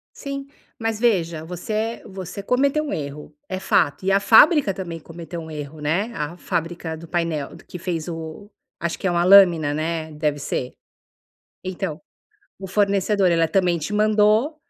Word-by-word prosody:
Sim, 275 -1 -6 0.3
mas 225 -2 -2
veja, 170 -9 +1
você 180 +6 -6
é 220 +2 -2
você 190 +1 -7
cometeu 275 +7 +1
um 290 - -4
erro, 145 - -6
é 185 - -3
fato, 175 -3 +1
e 195 - +2
a 195 - +4
fábrica 265 - +6
também 170 -3 -6
cometeu 170 +2 -8
um 160 -1 -9
erro, 150 0 -7
né, 175 +10 0
a 150 +3 -4
fábrica 165 -1 -3
do 165 +1 -11
painel 165 -4 -2
que 180 - -8
fez 170 -2 -3
o 165 +4 -7 0.3
acho 170 0 -3
que - - -3
é - - +3
uma 175 0 +2
lâmina, 175 -6 +6
né. 160 +1 -2
Deve 150 -1 -1
ser. 130 -2 -3 0.9
Então, 185 -3 -4 0.6
o 195 - -7
fornecedor, 200 0 +2
ela 165 -1 +3
também 175 0 +2
te 160 +6 -4
mandou, 215 +6 +3
175 Hz, 165 wpm, -22 LUFS, 160-205 Hz, 0.9 s, fábrica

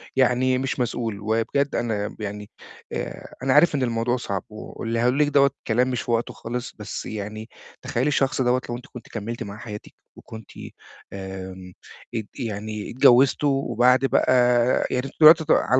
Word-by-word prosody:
يعني 130 0 +3
مش 135 +1 -2
مسؤول، 115 -4 -2
وبجد 115 +7 0
أنا 105 -3 -1
ب - - -11
يعني، 105 0 -6 0.4
آآ، - - -6
أنا 130 -1 +2
عارف 150 +2 +5
إن 135 - 0
الموضوع 120 +1 0
صعب، 100 -5 -4
واللي 115 +2 -5
هاقوله 125 +3 +2
لِك 150 - +3
دوَّة 140 -1 +4 0.2
كلام 125 +3 +2
مش 125 - -2
في - - -4
وقته 115 0 0
خالص، 120 +2 -6
بس 105 - -6
يعني 110 +1 -6 0.3
تخيّلي 125 +4 -1
الشخص 135 -1 +1
دوَّة 125 0 +2
لو 120 - -2
أنتِ 125 - -13
كنتِ 120 -2 -10
كملتِ 115 +2 -5
مع 100 +1 -8
حياتِك 105 -2 -9 0.2
وكنتِ 110 -2 -11 0.6
آمم، 95 -1 -8 0.4
ات 110 - -2
يعني 105 -2 -4
اتجوّزتوا، 130 +3 +5 0.2
وبعد 125 +3 +3
بقى 130 - +2 0.6
يعني 125 +1 -1
أنتم 135 - -9
دلوقتي 155 0 +8
ع - - +7
على 130 - +2
120 Hz, 170 wpm, -23 LUFS, 105-130 Hz, 0.6 s, دلوقتي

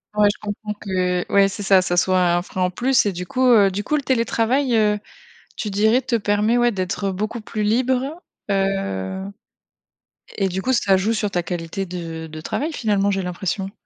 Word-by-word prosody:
Ouais, 210 0 +5
je - - -11
comprends 210 0 -5
que, 180 -2 -1
ouais, 200 -1 +6
c'est 205 +1 -6
ça, 190 -1 +5
ça 175 -1 -1
soit 185 +1 +3 0.2
un 175 - 0
frein 185 0 -5
en 180 - +2
plus, 245 +3 +2
et - - +1
du 180 0 -6
coup, 255 +7 +1
heu, 200 -4 +5
du 205 +2 -3
coup, 300 - 0
le 290 - -1
télétravail, 245 +1 +1
heu, 210 -1 +2 0.6
tu 210 - -4
dirais, 220 +5 +3
te 250 -2 0
permet, 210 +2 +1
ouais 240 0 +3
d'être 190 +1 -2
beaucoup 215 +5 -3
plus 215 0 -4
libre, 250 +4 +1 0.5
heu, 195 - -1 1.1
et 195 -2 +1
du 190 +2 -3
coup, 260 - 0
ça 200 -5 +3
joue 200 +4 +1
sur 210 -2 -1
ta 175 - 0
qualité 175 +2 -4
de 165 -2 -6
de 155 0 -9
travail, 300 - -2
finalement, 205 -5 +1
j'ai 195 -1 -1
l'impression? 190 +2 -3
200 Hz, 200 wpm, -21 LUFS, 185-225 Hz, 1.1 s, ouais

